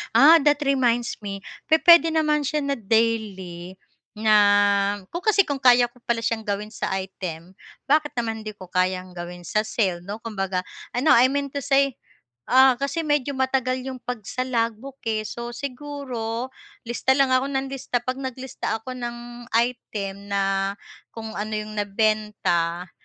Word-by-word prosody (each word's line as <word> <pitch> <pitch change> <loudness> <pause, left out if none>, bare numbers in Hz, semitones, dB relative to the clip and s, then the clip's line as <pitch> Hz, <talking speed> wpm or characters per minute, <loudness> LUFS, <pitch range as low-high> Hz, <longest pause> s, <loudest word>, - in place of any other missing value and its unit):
Ah, 320 +4 +9
that 295 0 +4
reminds 245 -3 +1
me 195 -1 -5 0.3
pupuwede 330 +1 +7
naman 300 -2 +2
siya 300 +2 0
na 280 0 0
daily 195 -5 -1 0.4
na 215 0 +3 0.8
ko 345 - -3
kasi 400 0 +4
kung 285 -4 -3
kaya 245 -1 +5
ko 245 - -22
pala 230 -1 0
siyang 220 -1 -2
gawin 205 +1 -3
sa - - -3
item, 185 -3 -6 0.3
bakit 295 +1 +1
naman 225 -2 -2
hindi 215 -1 -7
ko 185 -3 -13
kayang 185 0 0
gawin 175 0 -8
sa 215 +6 0
cell 190 -6 0
'no? 205 +4 -6
Kumbaga, 195 -4 -2 0.3
ah, 245 - +1
'no 315 - +5
I 245 +2 +6
mean 280 +1 -2
to 285 - -3
say, 275 -1 +1 0.5
ah, 260 0 +7
kasi 280 +5 -2
medyo 290 -2 +1
matagal 260 -1 +1
'yong 260 -2 -6
'pag 245 -3 -4
sa 255 - -2
logbook 245 +1 -2
eh, 215 -1 0
so 235 +2 -6
siguro 255 -3 -5 0.4
lista 245 +2 +1
lang 275 -1 +3
ako 255 +1 +3
nang 270 0 -2
lista, 250 -2 -2
'pag 255 +2 -3
naglista 260 -3 -4
ako 255 0 -7
ng 240 0 -7
item 210 -4 -1
na 195 0 0 0.4
kung 225 -1 -6
ano 215 +1 -3
'yong 215 0 -4
nabenta, 200 -5 0
235 Hz, 160 wpm, -24 LUFS, 205-265 Hz, 0.8 s, Ah